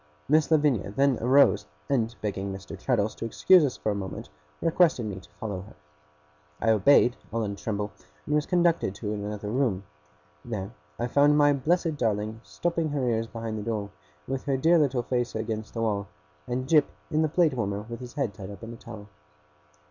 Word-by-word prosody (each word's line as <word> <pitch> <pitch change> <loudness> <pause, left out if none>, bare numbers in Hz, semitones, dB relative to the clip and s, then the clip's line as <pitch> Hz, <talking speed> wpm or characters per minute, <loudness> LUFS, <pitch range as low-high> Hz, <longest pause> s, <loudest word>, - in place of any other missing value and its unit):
Miss 155 +2 +3
Lavinia 145 - +2
then 135 +4 +2
arose, 130 - +4 0.2
and 120 -4 0
begging 100 -1 -2
Mr. 95 0 -7
Traddles 110 -5 0
to - - -6
excuse 175 +9 +5
us 135 -4 -1
for 105 - -1
a - - -2
minute, 95 -6 -6 0.3
requested 165 -6 +3
me 100 -3 -4
to 95 - -18
follow 100 -4 -4
her. 100 -1 -14 0.8
I 115 - +3
obeyed, 120 +3 +5 0.2
all 115 0 -1
in 100 - -2
a - - -5
tremble, 105 0 -3 0.3
and 150 - -2
was 150 0 +1
conducted 175 -2 +2
into 105 +2 -4
another 105 0 -4
room. 115 -7 0 0.6
There 105 -4 -5 0.3
I 120 - -1
found 145 +4 +4
my 145 -1 +5
blessed 160 +3 0
darling 110 -1 -1
stopping 170 -2 -2
her 140 -3 -1
ears 115 -1 0
behind 115 -1 -5
the - - -4
door, 105 -2 -3 0.4
with 135 0 -3
her 135 -2 +1
dear 165 +5 +4
little 135 -5 +1
face 120 0 -1
against 110 0 -4
the 115 - -1
wall; 100 -3 -1 0.4
and 130 +1 -2
Jip 150 -1 +5 0.2
in 155 0 +2
the 155 - +2
plate 165 -2 +3
warmer 105 -4 -2
with 115 0 -6
his 125 0 -9
head 135 -8 -1
tied 100 -2 -9
up 100 +2 -10
in 115 +1 -7
a - - -10
towel. 110 -3 -10
115 Hz, 195 wpm, -27 LUFS, 105-145 Hz, 0.8 s, excuse